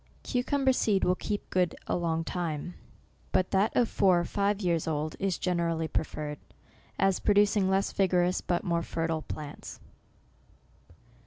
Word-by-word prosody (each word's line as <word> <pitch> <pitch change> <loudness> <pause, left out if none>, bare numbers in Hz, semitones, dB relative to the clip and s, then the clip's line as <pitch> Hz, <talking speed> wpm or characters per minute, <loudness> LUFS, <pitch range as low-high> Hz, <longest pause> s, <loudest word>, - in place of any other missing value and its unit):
Cucumber 265 +1 +1
seed 205 -6 +1
will 180 - +3
keep 205 +2 -4
good 180 -2 +1
a - - -1
long 165 -2 0
time; 170 -1 -3 0.6
but 185 - +1
that 195 +2 +3
of 245 - +4
four 185 -5 +3
or 175 - -1
five 200 +1 0
years 170 -5 0
old 155 0 -2
is 195 -2 0
generally 170 -3 0
preferred, 150 -2 -3 0.6
as 195 -1 +2
producing 205 -1 +3
less 195 +1 +1
vigor 185 -2 +2
ous, 180 +1 0
but 175 -1 -1
more 170 -3 0
fertile 165 -1 -2
plants. 150 -1 -8
180 Hz, 150 wpm, -29 LUFS, 165-200 Hz, 0.6 s, of